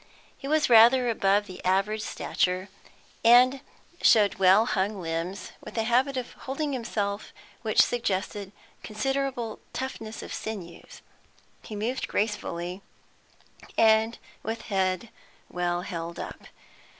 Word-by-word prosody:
He 275 Hz, -, -8 dB
was 310 Hz, +1 st, +2 dB
rather 245 Hz, +2 st, +7 dB
above 205 Hz, -1 st, +2 dB
the 185 Hz, -2 st, -10 dB
average 195 Hz, +4 st, +1 dB
stature, 185 Hz, -2 st, -1 dB, 0.5 s
and 250 Hz, +3 st, +6 dB, 0.4 s
showed 205 Hz, -4 st, +5 dB
well 195 Hz, +4 st, +6 dB
hung 200 Hz, -2 st, -1 dB
limbs, 165 Hz, +2 st, -4 dB
with -, -, -9 dB
a 225 Hz, -, +2 dB
habit 255 Hz, +4 st, +2 dB
of 250 Hz, -1 st, -4 dB
holding 280 Hz, +2 st, -4 dB
himself 210 Hz, -4 st, -3 dB, 0.3 s
which 220 Hz, -2 st, +4 dB
suggested 200 Hz, -3 st, -2 dB, 0.3 s
considerable 250 Hz, 0 st, -2 dB
toughness 225 Hz, -4 st, -5 dB
of -, -, -7 dB
sinews; 190 Hz, -6 st, -7 dB, 0.6 s
he 215 Hz, -, -8 dB
moved 230 Hz, +5 st, -2 dB
gracefully, 190 Hz, -3 st, -2 dB, 1.0 s
and 220 Hz, +1 st, +4 dB, 0.2 s
with 225 Hz, +1 st, -4 dB
head 190 Hz, +2 st, 0 dB, 0.4 s
well 175 Hz, 0 st, -1 dB
held 170 Hz, -2 st, -5 dB
up. -, -, -7 dB
215 Hz, 115 wpm, -27 LUFS, 190-240 Hz, 1.0 s, rather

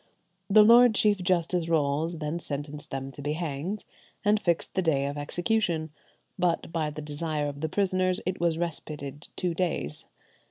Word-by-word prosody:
Lord 220 Hz, +3 st, +7 dB
Chief 205 Hz, -1 st, +3 dB
Justice 175 Hz, -1 st, +1 dB
Rolles 160 Hz, +1 st, +1 dB
then 155 Hz, +2 st, -3 dB
sentenced 145 Hz, -1 st, -4 dB
them 135 Hz, 0 st, -5 dB
to 145 Hz, -, -10 dB
be 145 Hz, +1 st, -1 dB
hanged, 165 Hz, +5 st, -4 dB, 0.4 s
and 210 Hz, +1 st, +4 dB
fixed 170 Hz, -5 st, 0 dB
the 190 Hz, -, +1 dB
day 145 Hz, -6 st, +1 dB
of 140 Hz, +1 st, -3 dB
execution; 170 Hz, +1 st, 0 dB, 0.5 s
but 170 Hz, -2 st, 0 dB
by 160 Hz, -2 st, 0 dB
the 150 Hz, 0 st, -7 dB
desire 150 Hz, 0 st, -2 dB
of 145 Hz, 0 st, -6 dB
the 160 Hz, -, -1 dB
prisoners 185 Hz, -1 st, +1 dB
it 185 Hz, +1 st, -2 dB
was 170 Hz, -2 st, +2 dB
respited 150 Hz, -3 st, -3 dB
two 180 Hz, -2 st, -1 dB
days. 165 Hz, -, -2 dB
165 Hz, 160 wpm, -27 LUFS, 145-185 Hz, 0.5 s, Lord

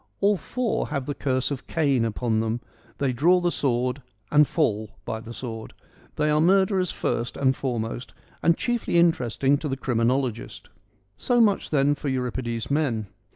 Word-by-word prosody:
All 205 Hz, +1 st, +4 dB
four 235 Hz, +4 st, -2 dB
have 135 Hz, -2 st, -3 dB
the 145 Hz, -, -2 dB
curse 130 Hz, -1 st, -1 dB
of 140 Hz, -, -5 dB
Cain 140 Hz, -7 st, +1 dB
upon 115 Hz, 0 st, 0 dB
them: 115 Hz, +1 st, -1 dB, 0.4 s
they 135 Hz, -3 st, 0 dB
draw 170 Hz, +9 st, +4 dB
the 175 Hz, -1 st, +1 dB
sword 125 Hz, -1 st, 0 dB, 0.3 s
and 150 Hz, 0 st, +6 dB
fall 110 Hz, -9 st, -1 dB
by 110 Hz, -, -3 dB
the 115 Hz, +1 st, -10 dB
sword. 115 Hz, -2 st, -7 dB, 0.4 s
They 150 Hz, 0 st, +1 dB
are 150 Hz, 0 st, +3 dB
murderers 190 Hz, +1 st, +3 dB
first 120 Hz, +1 st, -2 dB
and 130 Hz, -1 st, +2 dB
foremost, 120 Hz, -2 st, -4 dB, 0.3 s
and 170 Hz, 0 st, +3 dB
chiefly 240 Hz, -7 st, 0 dB
interesting 140 Hz, -4 st, +2 dB
to 150 Hz, -, -3 dB
the 135 Hz, -, -2 dB
criminologist. 125 Hz, -1 st, -1 dB, 0.5 s
So 245 Hz, -1 st, +1 dB
much 210 Hz, -4 st, +3 dB
then 145 Hz, -1 st, +3 dB
for 145 Hz, 0 st, -4 dB
Euripides' 125 Hz, -2 st, -3 dB
men. 120 Hz, -9 st, 0 dB
135 Hz, 160 wpm, -25 LUFS, 120-160 Hz, 0.5 s, and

